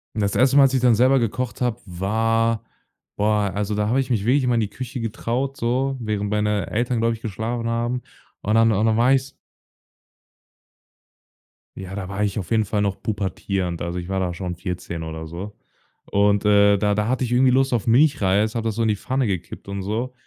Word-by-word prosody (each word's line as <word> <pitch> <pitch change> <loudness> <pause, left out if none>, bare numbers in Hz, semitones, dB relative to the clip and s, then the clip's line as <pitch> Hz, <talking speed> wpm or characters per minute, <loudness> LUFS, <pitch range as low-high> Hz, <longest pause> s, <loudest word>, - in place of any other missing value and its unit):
Das 100 -2 0
1. 130 +2 +4
Mal, 140 - +8
als 135 -1 +3
ich 130 - +2
dann 125 -2 +5
selber 130 +4 +4
gekocht 120 0 -3
habe, 120 -2 0
war 110 +5 0 0.5
boah, 105 -1 +1
also, 105 +1 -2
da 105 0 0
habe 125 +5 +2
ich 135 -1 -2
mich 105 -5 0
wirklich 130 +3 +3
immer 125 -1 +2
in - - +2
die 105 - -2
Küche 125 +3 -6
getraut, 120 +4 -2
so, 130 +3 0
während 105 -3 -2
meine 105 -1 0
Eltern, 120 +2 0
glaube 115 0 +2
ich, 110 - -15
geschlafen 115 +2 -3
haben. 120 +2 -1 0.4
Und 105 +2 0
dann 115 0 +5
und 105 +1 +1
dann 110 -1 +2
war 125 +3 +4
ich's 135 0 -1 2.4
Ja, 95 0 -7
da 95 -2 -5
war 100 +1 -2
ich 100 0 -1
auf 95 -5 -5
jeden 110 -1 +3
Fall 105 +1 -1
noch 100 -1 -2
pubertierend. 95 -3 -2
Also, 85 +1 -3
ich 90 0 -6
war 95 0 -1
da 90 -2 -1
schon 90 0 -5
14 90 -2 -5
oder 80 0 -6
so. 90 +6 -7 0.6
Und, 100 0 +3
äh, 100 -1 +5
da 105 +1 +1
da 105 +1 0
hatte 130 +2 0
ich 120 - -3
irgendwie 125 +1 +4
Lust 135 +1 +2
auf 115 -3 -1
Milchreis, 110 -5 +3
habe 115 -1 -2
das 110 - -2
so 115 - -1
in 110 - +2
die 105 - +2
Pfanne 130 +5 -1
gekippt 90 -2 -5
und 100 0 -4
so. 115 +6 -3
110 Hz, 215 wpm, -22 LUFS, 100-120 Hz, 2.4 s, Mal